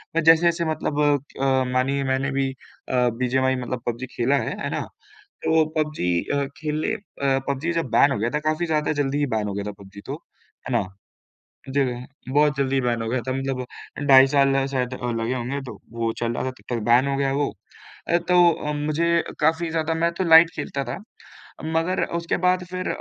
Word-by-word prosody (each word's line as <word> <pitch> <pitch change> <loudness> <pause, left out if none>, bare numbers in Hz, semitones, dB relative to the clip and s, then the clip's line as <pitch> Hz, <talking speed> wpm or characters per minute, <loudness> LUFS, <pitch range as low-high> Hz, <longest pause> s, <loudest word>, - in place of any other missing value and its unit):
अ, 165 - +3
जैसे-जैसे 170 +1 +4
मतलब 155 -2 -2
अ, 145 -1 +4 0.2
क 130 -1 +2
मानिए 135 +2 +1
मैंने 135 +1 0
भी 135 0 0
अ, 125 -1 -2
बीजीएमआई 130 +1 +1
मतलब 125 -1 -4
पबजी 120 +2 -3
खेला 125 +4 +2
है, 125 - -2
है - - -1
ना? - - -2 0.6
तो 160 -1 +4
पबजी 150 - -1 0.2
अ, 140 -1 +1
खेले 155 +5 -2
अ, 140 -10 -1
पबजी 140 +5 -1
जब 165 0 -1
बैन 140 - +5
हो 105 - 0
गया 115 - 0
था, 150 - -1
काफ़ी 155 +3 0
ज़्यादा 155 -2 0
जल्दी 140 +1 -1
ही 145 - +2
बैन 105 -1 -1
हो 100 - -3
गया 100 0 -3
था - - -3
पबजी 100 +1 -12
तो, - - -4 0.6
है - - -2
ना? 100 - -2 0.9
जगह 125 -3 0 0.3
बहुत 150 -1 +4
जल्दी 135 -1 +1
बैन 120 -2 0
हो 115 - -3
गया 125 +2 0
था 130 - +1
मतलब 135 -1 -2
अ, 125 - -11
ढाई 135 -1 +8
साल 135 -1 +3
शायद 130 -2 -2 0.3
लगे 120 +3 -1
होंगे 130 +3 -3
तो 130 - -9 0.2
वो 115 -1 0
चल 120 0 0
रहा - - -2
था, 130 - -1
तब 130 - -17
तक 115 - -2
बैन 125 +3 +5
हो 140 - 0
गया 135 -1 +1
वो। 145 0 0 0.6
अ, 170 - +4
तो 175 0 +4
अ, 150 -1 -3
मुझे 160 +3 +1 0.2
काफ़ी 160 +2 +2
ज़्यादा 160 0 0
मैं 170 +1 +1
तो 190 - +1
लाइट 165 +1 +8
खेलता 140 -1 -3
था, - - -5 0.7
मगर 165 +3 0
उसके 170 -1 -1
बाद 180 0 +3
फिर 185 0 -3
140 Hz, 205 wpm, -23 LUFS, 130-160 Hz, 0.9 s, ढाई